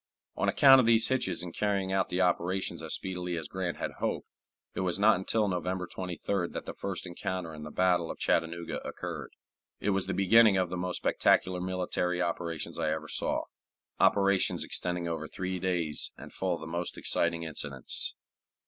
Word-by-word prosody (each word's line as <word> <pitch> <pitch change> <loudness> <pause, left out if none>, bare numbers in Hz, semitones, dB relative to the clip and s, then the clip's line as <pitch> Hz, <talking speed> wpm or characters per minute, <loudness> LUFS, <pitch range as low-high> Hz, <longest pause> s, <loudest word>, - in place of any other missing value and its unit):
On - - +1
account 135 -2 +8
of 120 - +3
these 115 -1 +5
hitches 130 -8 0
in 90 - -6
carrying 100 0 0
out 95 -1 +1
the 90 - 0
operations 90 +1 0
as - - 0
speedily 90 -2 -3
as 80 -3 -4
Grant 95 -1 -3
had - - -3
hoped, - - -2 0.5
it - - -4
was 90 -2 0
not 105 -2 +5
until 105 +3 +1
November 90 0 -2
23d 90 +1 -3
that - - -5
the - - -5
first 95 -2 -4
encounter 90 -1 -4
in 75 - -9
the 75 - -6
battle 90 0 +2
of - - -5
Chattanooga 85 0 -1
occurred. - - -6 0.5
It 105 - 0
was 95 -1 0
the 95 - -1
beginning 105 +1 +6
of 90 -2 +1
the - - -2
most 90 0 -2
spectacular 90 -1 +2
military 90 -1 -1
operations 85 -2 -3
I - - +1
ever 80 0 -3
saw - - 0 0.6
operations 100 -1 +3
extending 90 -1 -2
over 80 -2 -3
three 95 +2 -4
days 85 -4 -1
and - - -11
full 95 -2 -1
of 85 - -10
the - - -6
most 85 +2 -3
exciting 85 -1 0
incidents. 70 -4 -1
90 Hz, 185 wpm, -30 LUFS, 85-95 Hz, 0.6 s, account